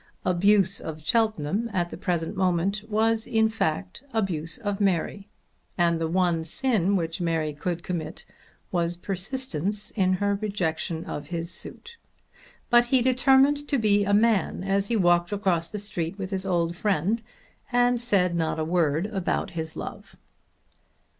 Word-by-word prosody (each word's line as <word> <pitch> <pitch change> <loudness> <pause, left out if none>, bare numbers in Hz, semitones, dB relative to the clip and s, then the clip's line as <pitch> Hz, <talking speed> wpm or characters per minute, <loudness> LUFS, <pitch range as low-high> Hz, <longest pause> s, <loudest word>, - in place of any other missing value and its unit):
Abuse 195 +1 +3
of 155 -1 -7
Cheltenham 220 0 +1
at 175 -3 -1
the - - -5
present 170 +1 -2
moment 190 +2 +1
was 220 +1 +1
in 220 -1 +3
fact 155 - -2
abuse 170 -6 0
of 205 -4 -3
Mary; 195 +1 0 0.5
and 170 -2 +2
the 165 - +1
one 170 -1 +1
sin 200 +1 +1
which 165 -2 -2
Mary 160 -3 0
could 170 +3 -3
commit 165 -3 -5 0.5
was 170 -1 0
persistence 200 - -2
in 185 -3 +2
her 200 +2 +1
rejection 170 -5 -2
of 145 - -6
his 170 0 -4
suit. 465 0 -7 0.7
But 240 0 +6
he 250 0 +3
determined 270 +3 +4
to 280 - +1
be 205 -3 +3
a 200 - 0
man 205 -4 +2
as 195 +1 0
he 235 - 0
walked 175 -3 +3
across 185 -5 0
the 210 - -5
street 195 -3 -3
with 195 -1 -5
his 190 0 -2
old 170 -2 0
friend, 205 +3 0 0.5
and 245 0 +3
said 195 -7 +2
not 160 -1 0
a 155 - -1
word 165 -1 +1
about 195 -4 -2
his 160 -2 -4
love. - - -8
190 Hz, 155 wpm, -26 LUFS, 170-215 Hz, 0.7 s, But